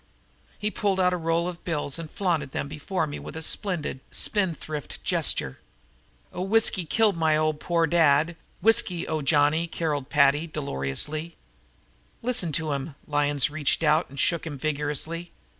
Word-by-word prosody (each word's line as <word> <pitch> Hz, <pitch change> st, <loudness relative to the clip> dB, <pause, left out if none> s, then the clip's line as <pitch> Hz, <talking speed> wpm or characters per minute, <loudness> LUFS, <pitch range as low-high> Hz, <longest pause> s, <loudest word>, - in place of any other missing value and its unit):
He 210 Hz, +1 st, -2 dB
pulled 200 Hz, -3 st, 0 dB
out 180 Hz, -1 st, +3 dB
a -, -, +1 dB
roll 165 Hz, 0 st, 0 dB
of 175 Hz, -1 st, -7 dB
bills 150 Hz, -2 st, -2 dB
and 165 Hz, -2 st, -6 dB
flaunted 160 Hz, -9 st, -1 dB
them -, -, -2 dB
before 155 Hz, +4 st, -2 dB
me 145 Hz, -, -6 dB
with -, -, -8 dB
a 160 Hz, -, -4 dB
splendid, 170 Hz, -8 st, 0 dB
spendthrift 165 Hz, -, -2 dB
gesture. 65 Hz, -, 0 dB, 0.7 s
"Oh, -, -, -4 dB
whiskey 195 Hz, -2 st, +3 dB
killed 210 Hz, +4 st, +2 dB
my 160 Hz, -2 st, +2 dB, 0.3 s
poor 170 Hz, 0 st, +1 dB
old 160 Hz, -, 0 dB
dad! 160 Hz, 0 st, +4 dB, 0.3 s
Whiskey! 220 Hz, -6 st, +3 dB
O 155 Hz, -1 st, -1 dB
Johnny!" 150 Hz, +3 st, +3 dB
carolled 150 Hz, -4 st, -2 dB
Paddy 150 Hz, +1 st, +4 dB
dolorously. 150 Hz, -, -3 dB, 0.9 s
"Listen 235 Hz, -9 st, +1 dB
to 155 Hz, 0 st, 0 dB
'im!" 140 Hz, +1 st, -4 dB
Lyons 145 Hz, -1 st, +1 dB
reached 155 Hz, +1 st, 0 dB
over 155 Hz, +2 st, +4 dB
and 140 Hz, +1 st, -9 dB
shook 170 Hz, -1 st, +1 dB
him 145 Hz, -3 st, -5 dB
vigorously. 155 Hz, +4 st, -2 dB
160 Hz, 155 wpm, -26 LUFS, 145-175 Hz, 0.9 s, dad